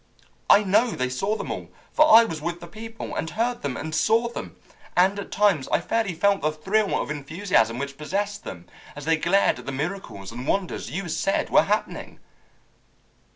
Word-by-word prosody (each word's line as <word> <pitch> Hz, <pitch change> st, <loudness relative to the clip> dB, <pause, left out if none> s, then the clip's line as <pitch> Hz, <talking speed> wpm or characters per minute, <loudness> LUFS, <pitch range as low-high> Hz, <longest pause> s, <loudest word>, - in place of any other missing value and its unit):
I 210 Hz, -, +7 dB
know 205 Hz, +5 st, +3 dB
they 130 Hz, -, -2 dB
saw 195 Hz, +12 st, -1 dB
them -, -, -5 dB
all, -, -, -5 dB, 0.2 s
for 310 Hz, 0 st, +5 dB
I 230 Hz, +1 st, +10 dB
was 165 Hz, -9 st, -5 dB
with 170 Hz, +2 st, -3 dB
the 170 Hz, -, -9 dB
people, 225 Hz, +5 st, -8 dB
and 160 Hz, -, -2 dB
heard 240 Hz, +4 st, -1 dB
them, 140 Hz, -3 st, -3 dB
and 160 Hz, +1 st, -5 dB
saw 225 Hz, +7 st, +2 dB
them, 235 Hz, -, -7 dB, 0.4 s
and 190 Hz, +3 st, +4 dB
at 200 Hz, -, -7 dB
times 195 Hz, -9 st, +2 dB
I -, -, +2 dB
fairly 200 Hz, 0 st, -1 dB
felt 200 Hz, +3 st, +2 dB
the 155 Hz, -, +1 dB
thrill 195 Hz, +7 st, 0 dB
of -, -, -3 dB
enthusiasm 145 Hz, -, 0 dB
which 140 Hz, +1 st, -5 dB
possessed 205 Hz, +6 st, -3 dB
them 85 Hz, -1 st, -8 dB, 0.3 s
as 145 Hz, -1 st, -8 dB
they 165 Hz, 0 st, +3 dB
glared 175 Hz, -3 st, +2 dB
at 125 Hz, -, -12 dB
the -, -, -2 dB
miracles 140 Hz, -, -5 dB
and 125 Hz, +4 st, -7 dB
wonders 195 Hz, -3 st, -1 dB
you 190 Hz, +2 st, -4 dB
said 195 Hz, +3 st, -1 dB
were -, -, +7 dB
happening." -, -, -2 dB
180 Hz, 195 wpm, -24 LUFS, 150-205 Hz, 0.4 s, I